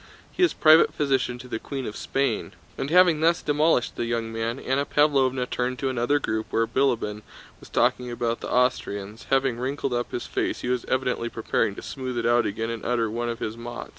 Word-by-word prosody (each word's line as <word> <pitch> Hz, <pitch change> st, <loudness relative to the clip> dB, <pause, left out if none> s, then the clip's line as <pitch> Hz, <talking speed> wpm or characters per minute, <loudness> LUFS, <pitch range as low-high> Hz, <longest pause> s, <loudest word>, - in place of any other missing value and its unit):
He -, -, -5 dB
is 360 Hz, -, +5 dB
private 155 Hz, +1 st, +5 dB
physician 135 Hz, -4 st, 0 dB
to 125 Hz, +1 st, -11 dB
the 110 Hz, -2 st, -4 dB
Queen 135 Hz, 0 st, -5 dB
of 105 Hz, -, -5 dB
Spain." 135 Hz, -5 st, -1 dB, 0.2 s
And 135 Hz, -, -3 dB
having 175 Hz, -2 st, +5 dB
thus 165 Hz, +2 st, +2 dB
demolished 150 Hz, -3 st, +2 dB
the 120 Hz, -, -1 dB
young 115 Hz, -1 st, -2 dB
man, 115 Hz, +2 st, -2 dB
Anna 135 Hz, +2 st, 0 dB
Pávlovna 135 Hz, -4 st, +2 dB
turned 125 Hz, +1 st, -2 dB
to 135 Hz, -, -1 dB
another 130 Hz, +3 st, +1 dB
group 110 Hz, -5 st, -2 dB
where 115 Hz, -, +1 dB
Bilíbin 115 Hz, -4 st, 0 dB, 0.4 s
was -, -, -15 dB
talking 125 Hz, -1 st, +1 dB
about 120 Hz, -1 st, -2 dB
the -, -, -6 dB
Austrians: 110 Hz, -4 st, -1 dB
having 135 Hz, -3 st, +1 dB
wrinkled 135 Hz, +1 st, -2 dB
up 120 Hz, 0 st, -2 dB
his 120 Hz, -, -4 dB
face -, -, -2 dB
he 120 Hz, -, -3 dB
was 125 Hz, -1 st, -1 dB
evidently 125 Hz, -2 st, -1 dB
preparing 110 Hz, -3 st, -1 dB
to -, -, -9 dB
smooth 130 Hz, -2 st, -5 dB
it 115 Hz, -, -1 dB
out 120 Hz, 0 st, +3 dB
again 115 Hz, +3 st, -3 dB
and 115 Hz, -2 st, -6 dB
utter 115 Hz, -3 st, 0 dB
one 120 Hz, +1 st, -2 dB
of 115 Hz, -, -3 dB
his 110 Hz, 0 st, -4 dB
mots. 120 Hz, +1 st, -7 dB
125 Hz, 210 wpm, -25 LUFS, 115-135 Hz, 0.4 s, is